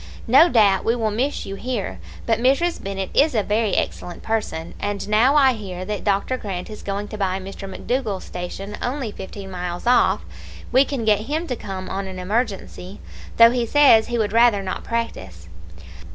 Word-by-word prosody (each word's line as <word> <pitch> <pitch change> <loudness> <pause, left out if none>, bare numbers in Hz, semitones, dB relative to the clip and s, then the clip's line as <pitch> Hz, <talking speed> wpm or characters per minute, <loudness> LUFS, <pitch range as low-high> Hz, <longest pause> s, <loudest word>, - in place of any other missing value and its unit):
No 275 +8 +6
doubt 205 - +4
we 230 - +1
will 220 -3 -1
miss 260 +7 -1
you 195 - -6
here; 200 - -4 0.3
but 225 -1 +1
Mrs. 275 +8 +1
Bennett 195 -1 -4
is 290 -2 +3
a 215 - +2
very 210 -1 0
excellent 175 - -3
person, 210 -7 -3
and 205 -1 -3
now 230 +7 +4
I 270 -3 +5
hear 185 -5 -6
that 210 -1 -4
Dr. 200 +5 0
Grant 195 -3 -6
is 215 - -9
going 200 +1 -4
to 215 - -7
buy 190 -1 0
Mr. 195 +1 -8
McDougall's 215 -2 -2
station, 195 +3 -6
only 250 -3 -3
fifteen 195 0 -9
miles 180 0 -5
off, 245 +1 +3 0.5
we 260 +3 +5
can 265 -6 -3
get 215 +1 +2
him 315 +3 -1
to 255 - -3
come 190 -4 -6
on 195 0 -4
an 190 -1 -7
emergency, 195 -1 -3 0.4
though 230 0 +8
he 245 -1 0
says 265 -5 +6
he 240 - -2
would 215 -2 -1
rather 230 -4 +4
not 185 - -4
practise. 95 - -4
210 Hz, 185 wpm, -22 LUFS, 195-240 Hz, 0.5 s, though